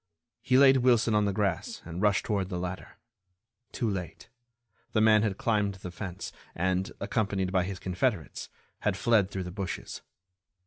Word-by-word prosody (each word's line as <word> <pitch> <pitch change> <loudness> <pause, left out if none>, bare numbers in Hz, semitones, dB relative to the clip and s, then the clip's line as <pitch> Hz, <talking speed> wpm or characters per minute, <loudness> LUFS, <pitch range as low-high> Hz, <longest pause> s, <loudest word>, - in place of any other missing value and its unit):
He 130 - +3
laid 135 -1 +7
Wilson 120 -3 +3
on 105 -1 +3
the 100 - +1
grass 100 -4 -2
and 85 +2 -5
rushed 105 -2 +2
toward 100 -4 -1
the 90 - -3
ladder. 90 +1 -6 0.7
Too 120 - -2
late—the 115 +4 -6
man 110 -1 +6
had 105 -3 -1
climbed 105 -3 +1
the 90 -1 -8
fence 90 0 -6 0.2
and, 95 +2 0
accompanied 100 -4 -1
by 95 -2 +2
his 95 -1 -5
confederates, 90 -1 -2 0.3
had - - 0
fled 110 -5 +3
through 95 -2 -4
the 90 - -6
bushes. 95 0 -5
100 Hz, 160 wpm, -29 LUFS, 95-110 Hz, 0.7 s, laid